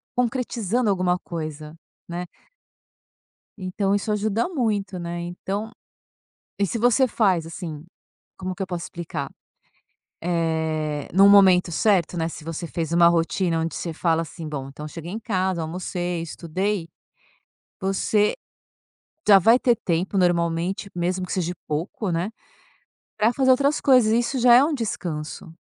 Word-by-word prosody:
concretizando 240 -2 0
alguma 180 -2 +1
coisa, 155 -2 -6 0.3
né. 175 +1 -4 1.3
Então 195 +1 -1
isso 205 +2 0
ajuda 215 - 0
muito, 210 - -1
né, 170 0 -4
então 195 +5 -4 0.9
e 200 - +2
se 230 - -3
você 245 +3 +4
faz, 190 -8 +2
assim 160 -2 -7 0.5
como 185 -1 -4
que 195 - -5
eu - - -2
posso 175 -2 -4
explicar? 160 -5 -5 0.9
Eh, 160 -3 -1
num 195 +2 +7
momento 190 -3 +6
certo, 180 +1 +2
né, 160 - 0
se 160 - -9
você 165 +1 -5
fez 165 0 -3
uma 170 0 +6
rotina 170 0 +1
onde 165 0 -2
você 170 - -4
fala 165 0 +1
assim: 165 -1 -8
"Bom, 135 -3 -5
então 150 +2 -9
eu - - -5
cheguei 165 +3 -8
em 225 - -4
casa, 190 -5 -1
almocei, 175 +1 -3
estudei", 170 +3 -3 0.9
você 205 +2 +1 0.9
já 200 -2 +9
vai 230 +7 +6
ter 245 -2 +3
tempo, 180 +1 -1
normalmente, 175 +2 +1
mesmo 180 +1 -1
que - - -6
seja 175 -2 -1 0.2
pouco, 175 +6 -3
né, 175 +6 -1 0.9
para 220 +3 +3
fazer 260 0 +3
outras 280 +3 +2
coisas. 250 -6 +5
Isso 240 +3 +1
já 240 0 +6
é 255 - +7
um 305 +1 +1
descanso. 165 - -4
180 Hz, 145 wpm, -24 LUFS, 165-210 Hz, 1.3 s, já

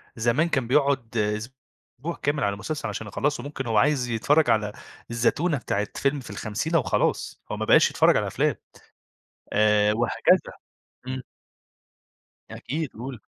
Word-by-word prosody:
زمان 120 +9 +1
كان 130 -6 0
بيقعد 135 -4 +1
أسبوع 120 +7 -5
كامل 145 -1 0
على 100 0 0
مسلسل 150 +9 -4
عشان 110 - -5
يخلّصه 140 +5 -1
ممكن 140 -2 -5
هو 115 -2 0
عايز 135 +2 +3
يتفرّج 140 +7 +2
على 105 -1 +2 0.4
الزتونة 145 +7 +1
بتاعة 105 -4 -2
فيلم 140 +1 0
في 125 - -10
الخمسينة 155 +10 -1
وخلاص، 130 - -1
هو - - -3
ما - - -2
بقاش - - +6
يتفرّج - - +4
على - - 0
أفلام - - 0 1.0
آآ 105 0 +4
وهكذا. 120 +2 +2 0.5
إمم. 130 0 -4 1.3
أكيد 155 +1 -4
قُل. 125 +1 -7
125 Hz, 140 wpm, -25 LUFS, 110-145 Hz, 1.3 s, بقاش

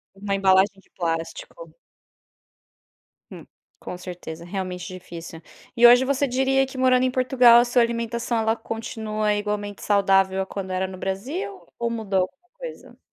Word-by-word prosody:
Uma 200 0 -2
embalagem 195 +1 +3
de - - -31
plástico. 180 - -4 1.6
Hum, - - -10 0.3
com 180 - -7
certeza 175 -2 -8
realmente 180 -1 -5
difícil. 170 -2 -9 0.3
E 240 0 +8
hoje 245 +2 +7
você 280 +1 +1
diria 265 +1 +2
que 265 0 -10
morando 255 -1 +3
em 255 - +1
Portugal, 250 -2 +6
a - - +1
sua 245 0 +3
alimentação, 235 0 -1
ela 220 0 +1
continua 220 -1 -3
igualmente 205 -1 -3
saudável 195 -1 +2
quando 190 -1 -6
era 185 +1 0
no 185 - -9
Brasil 285 - -5
ou 235 0 0
mudou 210 -5 -1
alguma 355 - -7
coisa. - - -9
215 Hz, 145 wpm, -23 LUFS, 190-250 Hz, 1.6 s, E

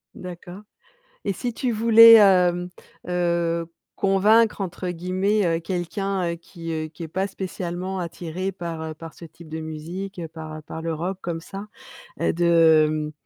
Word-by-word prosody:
D'accord. 180 +2 -9 0.6
Et 200 - 0
si 240 +5 -4
tu 250 0 -1
voulais, 230 +1 +8
hem, 180 -4 +4 0.4
heu, 170 -1 0 0.3
«convaincre», 210 +3 +3
entre 180 0 -4
guillemets, 185 +4 0
heu, 165 -1 +1
quelqu'un, 185 +1 -2
heu, - - -5
qui, 165 0 -9
heu, 155 -1 -3
qui 165 +2 -10
est - - -5
pas 190 +5 -2
spécialement 185 0 -5
attiré 175 +2 -4
par, 170 -3 -6
heu, 160 0 -5
par 165 -1 -10
ce - - -14
type 165 0 -14
de 160 +1 -5
musique, 170 +5 -6
par, 155 -1 -8
heu, - - -9
par 160 +2 -8
le 165 0 -2
rock, 180 +4 -4
comme 170 -1 -3
ça, 195 +5 -9 0.5
heu, - - +1
de, 165 -2 +5
hem, 155 0 -2
175 Hz, 165 wpm, -23 LUFS, 165-195 Hz, 0.6 s, voulais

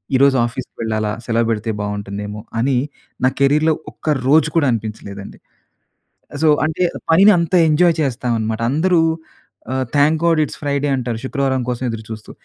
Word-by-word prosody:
ఈరోజు 135 +1 +4
ఆఫీస్‌కి 125 +2 -7
వెళ్ళాలా, 110 -1 -1 0.2
సెలవు 115 -1 +1
పెడితే 110 0 -2
బాగుంటుందేమో! 105 0 -5 0.2
అని 130 +2 +1 0.5
నా - - +5
కెరియర్‌లో 150 +3 +3 0.2
ఒక్క - - -5 0.2
రోజు 155 +2 +5
కూడా 150 -4 +3
అనిపించలేదండి. 105 -3 -6 1.1
సో, 160 - +5 0.2
అంటే, 160 +3 -1 0.3
పనిని 195 +6 +7
అంత 170 +1 -3 0.2
ఎంజాయ్ 165 +2 +4
చేస్తాం 125 -2 -2
అన్నమాట. 110 +1 -2
అందరూ 170 +4 +2 0.7
ఆహ్, 130 0 0
థాంక్ 150 +3 +4
గాడ్, 165 -2 +3
ఇట్స్ 150 - -6
ఫ్రైడే 145 0 -1
అంటారు. 120 -3 -3
శుక్రవారం 135 -1 0
కోసం 125 +1 -3
ఎదురు 115 -1 -5
చూస్తూ. 110 -1 -8
130 Hz, 150 wpm, -19 LUFS, 110-150 Hz, 1.1 s, పనిని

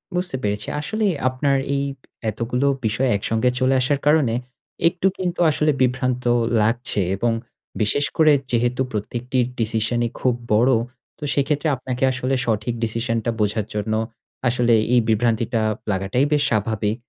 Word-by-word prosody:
বুঝতে 180 -5 -1
পেরেছি। 105 0 -2
আসলে 215 +7 -1 0.2
আপনার 135 +2 +1 0.2
এই 140 - 0 0.5
এতগুলো 120 +5 -1 0.2
বিষয় 120 +5 +1
একসঙ্গে 115 +4 +1
চলে 130 +1 +3
আসার 140 +2 +1
কারণে 150 -6 +4 0.5
একটু 180 +2 +1
কিন্তু 180 -2 -3
আসলে 150 +1 +2
বিভ্রান্ত 125 0 +1 0.4
লাগছে, 115 -1 +1
এবং 115 +4 0 0.5
বিশেষ 140 +7 +2
করে 155 -2 +6 0.2
যেহেতু 120 +2 +1
প্রত্যেকটির 120 +4 -1
ডিসিশন 115 +1 0
ই - - -7
খুব 125 - +2 0.2
বড় 120 +5 +4 0.5
তো - - -9
সেক্ষেত্রে 145 +2 0
আপনাকে 125 0 -4
আসলে 130 +1 -1
সঠিক 110 +1 -1
ডিসিশন 115 +1 -1
টা 115 - +1
বোঝার 105 0 0
জন্য 105 +1 -2 0.5
আসলে 120 -1 +2 0.2
এই 125 - +6
বিভ্রান্তিটা 115 +1 +1 0.3
লাগাটাই 95 +7 +1
বেশ 150 0 +3
স্বাভাবিক। 110 -1 0
120 Hz, 140 wpm, -22 LUFS, 110-135 Hz, 0.5 s, করে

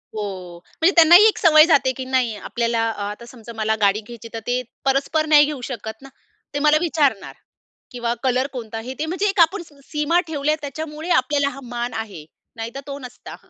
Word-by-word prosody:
हो. 185 -5 -6 0.2
म्हणजे 335 +4 +5
त्यांना 335 0 +8
ही 410 +4 +9
एक 435 - +1
सवय 310 -2 +6
जाते 285 -5 +3
की 260 - -5
नाही 255 -4 0
आपल्याला 230 0 -1
अ, 220 - -6
आता 210 +3 -9
समजा 235 -1 -12
मला 220 0 0
गाडी 205 +1 +3
घ्यायची 235 -1 -10
तर 225 - -4
ते 250 +1 0 0.2
परस्पर 275 +4 +1
नाही 300 -1 +6
घेऊ 290 -4 -5
शकत 220 -2 -7
ना? 270 - -12 0.4
ते 285 - -1
मला 300 +1 +4
विचारणार 295 - 0 0.6
किंवा 235 -1 -2
कलर 255 +1 +1
कोणता 225 -3 -6
हे 250 +3 -7
ते 310 - -1
म्हणजे 365 +5 -2
एक 390 -1 -3
आपण 340 +3 +3
स - - -22 0.2
सीमा 300 +3 +1
ठेवल्यात 305 0 -1
त्याच्यामुळे 310 +3 -6
आपल्याला 280 -1 +2
हा 275 - -10
मान 240 0 -4
आहे, 205 -9 -6 0.3
नाही 225 0 -6
तर - - -4
तो 280 0 -5
नसता. 250 -2 -10
260 Hz, 205 wpm, -21 LUFS, 230-305 Hz, 0.6 s, ही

